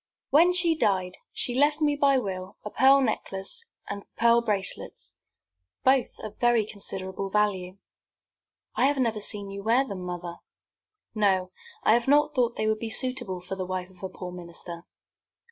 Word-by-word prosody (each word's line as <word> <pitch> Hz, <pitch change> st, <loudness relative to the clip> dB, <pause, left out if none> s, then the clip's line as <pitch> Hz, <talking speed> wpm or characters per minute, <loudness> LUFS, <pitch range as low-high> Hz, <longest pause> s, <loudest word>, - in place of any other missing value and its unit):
"When 335 Hz, +5 st, +6 dB
she 350 Hz, -2 st, +3 dB
died, 190 Hz, -, 0 dB
she 245 Hz, -, +1 dB
left 290 Hz, +4 st, +3 dB
me 295 Hz, -2 st, +2 dB
by 280 Hz, -1 st, +3 dB
will 190 Hz, -5 st, -4 dB
a 210 Hz, -, -5 dB
pearl 270 Hz, +1 st, +5 dB
necklace 195 Hz, -5 st, -3 dB, 0.2 s
and 200 Hz, 0 st, -5 dB
pearl 235 Hz, +1 st, +4 dB
bracelets, 205 Hz, -4 st, -2 dB, 0.7 s
both 260 Hz, -1 st, +2 dB
of 215 Hz, -1 st, -8 dB
very 240 Hz, -3 st, +3 dB
considerable 195 Hz, -2 st, -5 dB
value." 195 Hz, -3 st, 0 dB, 1.0 s
"I 260 Hz, -, +3 dB
have 285 Hz, 0 st, +1 dB
never 230 Hz, -5 st, 0 dB
seen 200 Hz, -1 st, -2 dB
you 200 Hz, 0 st, -6 dB
wear 235 Hz, +6 st, +3 dB
them, 195 Hz, -5 st, -6 dB
mother." 175 Hz, -1 st, -6 dB, 0.8 s
"No; 190 Hz, -4 st, +1 dB, 0.3 s
I 215 Hz, -, +5 dB
have 235 Hz, +1 st, +2 dB
not 295 Hz, +2 st, +4 dB
thought 240 Hz, -2 st, +1 dB
they 215 Hz, -, -1 dB
would 215 Hz, 0 st, +1 dB
be 230 Hz, -, -4 dB
suitable 245 Hz, -7 st, 0 dB
for 185 Hz, +2 st, -6 dB
the 185 Hz, -1 st, -4 dB
wife 185 Hz, 0 st, -4 dB
of 185 Hz, -, -20 dB
a 190 Hz, -, -4 dB
poor 180 Hz, -1 st, -8 dB
minister. 170 Hz, -1 st, -9 dB
210 Hz, 165 wpm, -27 LUFS, 185-255 Hz, 1.0 s, When